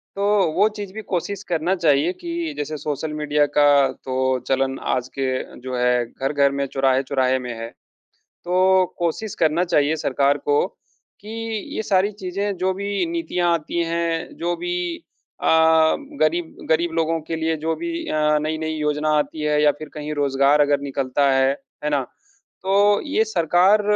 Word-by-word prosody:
तो 200 - -1 0.3
वो 200 +6 +4
चीज़ 200 -2 -6
भी 220 - -6
कोशिश 200 0 -3
करना 170 +2 +1
चाहिए 160 0 +2
कि 335 -2 -3
जैसे 150 +1 -3
सोशल 150 +1 -4
मीडिया 150 -1 +1
का 145 0 +6 0.2
तो 130 0 -1
चलन 135 0 0 0.2
आज 125 -1 -2
के 130 -1 -3
जो 130 0 -5
है 125 -1 +2
घर-घर 140 +3 0
में, 140 0 -1
चौराहे-चौराहे 130 -1 +1
में 125 -1 -5
है। 115 0 -5 0.5
तो 185 +1 +2
कोशिश 175 +5 -2
करना 160 +2 +3
चाहिए 155 -3 +2
सरकार 140 -1 +1
को 145 +2 +1 0.6
कि 210 - -11 0.5
ये - - -1
सारी 200 0 +2
चीज़ें 200 0 -3
जो 185 +1 0
भी 200 - -2
नीतियाँ 330 - 0
आती 170 +1 -1
हैं, 165 0 -2
जो 175 +1 -1
भी 175 0 -3 0.4
अ, - - 0 0.7
गरीब 165 +1 0
गरीब 165 +2 +2
लोगों 165 0 +1
के 165 +2 -4
लिए 160 0 0
जो 160 0 0
भी 340 - -5 0.2
अ, 150 0 +2
नई-नई 155 +1 -2
योजना 150 0 -1
आती 150 +1 -2
है 150 0 +1
या 150 - +6
फ़िर 155 -1 -8
कहीं 150 0 -5
रोज़गार 140 +1 +3
अगर 145 -1 +3
निकलता 140 0 0
है। 135 0 +3 0.3
है 150 - 0
ना? 145 -2 +1 0.6
तो 205 +2 +3
ये 285 -6 +2
सरकार 185 +1 +3
155 Hz, 165 wpm, -22 LUFS, 140-180 Hz, 0.7 s, का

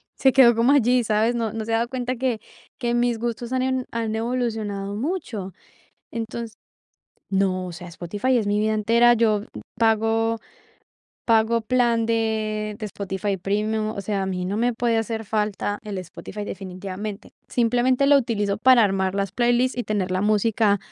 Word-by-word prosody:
se 265 - +4
quedó 240 -3 +7
como 230 +4 +3
allí, 250 -3 +4
¿sabes? 220 +2 +2
No 225 -3 -1
no 220 -1 -4
se 225 - -2
ha - - +4
dado 235 +1 -1
cuenta 255 -1 -2
que 245 -3 -1 0.4
que 240 -2 -1
mis 240 -1 +1
gustos 240 +1 -3
han 255 - +1
en 260 -1 -1
han 225 -1 -2
evolucionado 220 -4 -2
mucho. 230 - -4 0.6
Entonces 230 0 -5 0.8
no, 190 -2 0
o - - -6
sea, 175 +1 -9
Spotify 205 +9 -1
es 215 - -1
mi 205 +1 +1
vida 215 0 +1
entera, 230 +3 +4
yo, 220 -3 +2
mm, 210 - -11 0.2
pago 225 0 +2 0.9
pago 230 0 +3
plan 235 -1 +2
de 215 -2 -1
de 215 - -4
Spotify 200 0 -3
Premium, 215 +3 -1
o 210 - -5
sea, 200 0 -1
a 190 - -2
mí 180 -1 -2
no 195 +3 -2
me 240 +2 +2
puede 235 0 +1
hacer 225 0 -3
falta 210 -1 -1
el 210 -2 -6
Spotify 190 +3 -7
definitivamente, 195 +2 -6 0.2
simplemente 245 +3 +2
lo 285 - +7
utilizo 210 -5 -1
para 250 -1 +6
armar 190 -1 0
las 200 -1 -1
playlist, 245 +3 +2
y 245 - -1
tener 200 -3 -1
la 185 0 0
música 210 0 +2
220 Hz, 175 wpm, -23 LUFS, 205-240 Hz, 0.9 s, quedó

